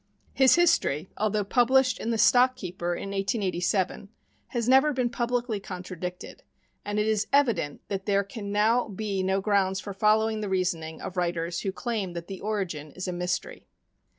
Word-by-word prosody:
His 265 -1 +5
history, 190 - +2
although 215 0 0
published 255 +5 +3
in 230 - -3
the 230 - 0
Stock 250 +3 +5
Keeper 175 -5 -4
in 195 - -6
1887, 195 -1 -1 0.4
has 235 -2 -2
never 270 +4 +5
been 250 -2 0
publicly 240 -2 -1
contradicted, 180 -1 -7 0.4
and 205 0 -3
it 210 - +2
is 215 -1 +1
evident 235 - +2
that 195 -1 -4
there 200 -1 +3
can 200 0 -7
now 220 +4 +2
be 200 -1 -3
no 190 +1 +1
grounds 190 -2 +1
for 200 +1 -6
following 215 +2 +2
the 205 - -3
reasoning 170 -4 -2
of 185 - -6
writers 170 -1 -1
who 195 - -2
claim 205 -4 -3
that 170 -1 -6
the 190 0 -8
origin 185 -8 -3
is 185 +1 -5
a 180 - -2
mystery. 180 -1 -3
200 Hz, 170 wpm, -27 LUFS, 185-225 Hz, 0.4 s, His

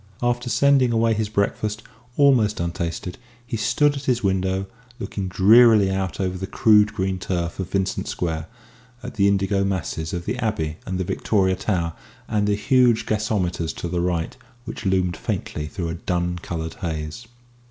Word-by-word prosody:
After 120 0 0
sending 130 +1 +4
away 115 0 +2
his 110 -1 -1
breakfast 105 +1 -1 0.3
almost 125 -7 +4
untasted 85 +3 -4 0.3
he 120 -1 -4
stood 120 +7 +2
at 140 0 -6
his 125 -2 +1
window, 95 0 0 0.3
looking 100 -6 -4
drearily 105 +2 +6
out 95 -1 -2
over 95 -1 -2
the 95 - -4
crude 105 0 +4
green 95 0 -2
turf 85 -1 -3
of 95 -1 -3
Vincent 95 -1 -1
Square 80 -2 -3 0.6
at 125 - -6
the 100 -2 +3
indigo 100 0 +1
masses 80 -4 -2
of 85 -1 -4
the 125 - -3
Abbey 80 -10 -2
and 95 -1 -2
the 95 - -1
Victoria 95 0 +1
Tower 90 -4 -1 0.3
and 105 -2 0
the 105 - +2
huge 120 +2 +3
gasometers 100 -6 -1
to - - -5
the 85 0 -1
right 85 -2 -1 0.3
which - - -5
loomed 90 -2 +1
faintly 75 0 -4
through 85 +1 -4
a - - -3
dun 90 +1 -2
coloured 80 -2 -5
haze. 80 +6 -4
95 Hz, 165 wpm, -23 LUFS, 90-110 Hz, 0.6 s, drearily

